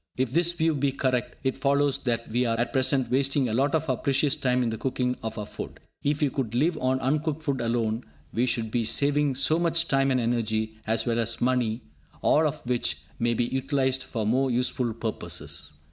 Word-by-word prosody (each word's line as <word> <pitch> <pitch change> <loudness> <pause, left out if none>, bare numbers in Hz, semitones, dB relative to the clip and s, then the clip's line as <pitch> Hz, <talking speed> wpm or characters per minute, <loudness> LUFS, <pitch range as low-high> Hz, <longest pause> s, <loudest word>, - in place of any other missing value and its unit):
If 130 -2 0
this 170 +4 +3
view 165 -1 +1
be 140 -1 +1
correct, 125 -2 -1
it 130 0 -1
follows 140 0 +2
that 115 -2 0
we 120 +3 +1
are 115 -2 0
at 120 - -1
present 130 -1 +2
wasting 135 0 +2
a 110 - -2
lot 140 +5 +2
of 160 0 0
our 130 -3 +1
precious 140 +1 +2
time 125 -1 +1
in 115 - 0
the 110 - -3
cooking 125 -1 -1
of 110 0 -5
our 105 - -3
food. - - -8 0.2
If 145 +1 0
we 145 -3 +2
could 120 -5 -3
live 160 +7 +2
on 130 +1 +1
uncooked 150 +3 0
food 140 -4 -1
alone, 115 0 -1 0.3
we 125 +3 +1
should 110 -3 -1
be 120 0 +1
saving 145 +3 +1
so 140 +5 +1
much 170 0 +1
time 135 0 +2
and 130 -1 +2
energy, 110 -2 -1
as 110 +1 +1
well 120 -1 +1
as 115 0 0
money, 120 -2 +1 0.4
all 155 +1 +4
of 150 -2 -5
which 120 -11 0 0.2
may 120 0 +1
be 120 - +1
utilised 130 0 0
for 110 -3 -3
more 130 +5 +2
useful 125 -1 0
purposes. 110 -8 -4
130 Hz, 210 wpm, -26 LUFS, 115-140 Hz, 0.4 s, all